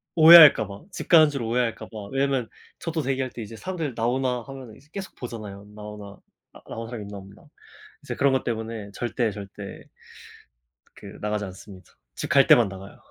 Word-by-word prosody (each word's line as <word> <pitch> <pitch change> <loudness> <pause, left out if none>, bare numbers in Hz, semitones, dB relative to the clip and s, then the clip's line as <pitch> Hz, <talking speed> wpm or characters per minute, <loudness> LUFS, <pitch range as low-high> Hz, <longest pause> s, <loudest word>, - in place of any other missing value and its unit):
오해할까 160 - +9
봐 100 +4 -10
집 - - -7
가는 160 -3 +7
줄 140 -3 -4
오해할까 115 0 -1
봐 105 -3 -9
왜냐하면 135 -3 0 0.3
저도 165 -1 -3
대기할 135 -1 -2
때 120 - -8
이제 110 +1 -8
사람들 165 -1 -4
나오나 125 +2 0
하면은 130 -5 -10
이제 145 +3 -21
계속 195 0 -7
보잖아요. 105 -5 -8
나오나 105 -1 -10 0.4
아 - - -15
나온 115 0 -6
사람 115 -3 -7
있나 100 0 -8
없나. 100 +1 -14 0.6
이제 - - -5
그런 140 -1 +2
것 130 - 0
때문에 110 -3 -5
절대 120 0 -2
절대 100 0 -9 1.1
그 - - -12
나가지 105 0 -2
않습니다. 95 0 -12 0.2
집 - - -5
갈 - - +5
때만 120 -3 +6
나가요. 95 +1 -11
115 Hz, 375 characters per minute, -25 LUFS, 105-135 Hz, 1.1 s, 오해할까